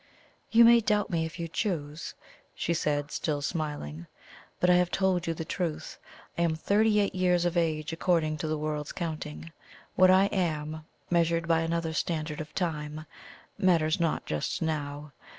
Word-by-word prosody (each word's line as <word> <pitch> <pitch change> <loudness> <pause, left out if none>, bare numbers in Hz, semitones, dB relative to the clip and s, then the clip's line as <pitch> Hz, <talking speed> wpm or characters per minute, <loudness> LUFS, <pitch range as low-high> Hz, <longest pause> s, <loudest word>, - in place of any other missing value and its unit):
"You 230 +1 +7
may 235 0 +8
doubt 210 -2 +1
me 165 -1 0
if 160 - -11
you 170 - -3
choose," 160 -5 -3 0.4
she 170 - -1
said, 150 -2 -1
still 150 -3 -1
smiling; 145 - -4 0.5
"but 180 - +3
I 180 - +6
have 180 -1 +2
told 185 -3 +1
you 165 - -1
the 160 - -5
truth. 170 -3 -4 0.4
I - - +2
am 165 -2 +2
thirty 210 +5 +2
eight 200 - +1
years 180 -1 +2
of 175 0 0
age 160 -2 0
according 165 -2 +1
to 155 - -3
the 155 0 -1
world's 150 -1 -3
counting. 85 - -5 0.4
What 185 0 +6
I 190 +1 +6
am, 155 -4 -2 0.3
measured 170 -1 +2
by 165 -1 +3
another 165 0 -1
standard 155 -2 -2
of 155 0 -10
time, 155 -3 -3 0.5
matters 170 -5 +3
not 165 -2 0
just 75 -1 -2
now. 150 -2 -3
165 Hz, 170 wpm, -28 LUFS, 155-180 Hz, 0.5 s, may